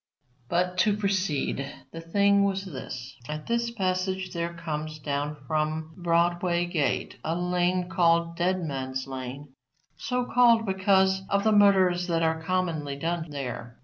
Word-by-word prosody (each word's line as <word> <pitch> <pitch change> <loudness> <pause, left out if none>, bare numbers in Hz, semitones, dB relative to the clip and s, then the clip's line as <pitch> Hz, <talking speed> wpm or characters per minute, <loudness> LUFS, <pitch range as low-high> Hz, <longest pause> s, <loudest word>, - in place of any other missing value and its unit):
But, 180 +1 0
to 205 +1 +3
proceed, 185 -9 -1 0.2
the 165 - -7
thing 200 +4 +3
was 195 0 0
this. 130 -5 -7
At 150 0 -5
this 235 0 0
passage 185 -3 -1
there 170 0 -2
comes 155 -2 -4
down 145 0 -2
from 155 +2 -2
Broadway 175 0 +1
gate 165 -5 -1
a 160 +1 -1
lane 180 0 +1
called 170 -1 +2
Dead 180 +1 0
Man's 130 -3 -3
lane, 130 +1 -7 0.4
so 250 -1 -1
called 235 -2 +4
because 190 0 +3
of 200 0 +2
the 220 - +3
murders 190 -4 +4
that 165 -1 +1
are 160 0 +1
commonly 160 -5 -1
done 165 +2 -3
there. 125 -4 -6
175 Hz, 145 wpm, -27 LUFS, 155-190 Hz, 0.4 s, called